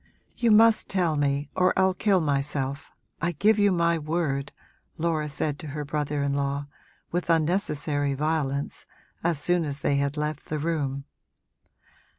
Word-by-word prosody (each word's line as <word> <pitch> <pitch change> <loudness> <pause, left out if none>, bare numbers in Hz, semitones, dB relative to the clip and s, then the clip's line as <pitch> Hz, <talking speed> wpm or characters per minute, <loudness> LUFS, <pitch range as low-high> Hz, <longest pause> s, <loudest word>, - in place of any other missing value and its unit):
'You 235 -2 +1
must 225 +1 +5
tell 175 -5 +1
me 145 0 0
or 185 0 +2
I'll 190 0 +4
kill 190 0 +2
myself 140 -2 -2 0.3
I 175 0 0
give 210 +7 +3
you 205 -1 +4
my 170 -2 +2
word!' 150 -3 -1 0.5
Laura 155 -2 0
said 145 0 -2
to 155 - -7
her 150 - -3
brother 145 0 -2
in 140 0 0
law, 140 0 -1 0.5
with 175 0 -2
unnecessary 150 -4 +1
violence, 145 -2 -2 0.4
as 170 -2 +1
soon 175 +4 +1
as 140 -2 -4
they 140 - +1
had 140 +1 -1
left 150 -1 -3
the 155 - -2
room. 145 -3 -2
150 Hz, 155 wpm, -26 LUFS, 140-170 Hz, 0.5 s, must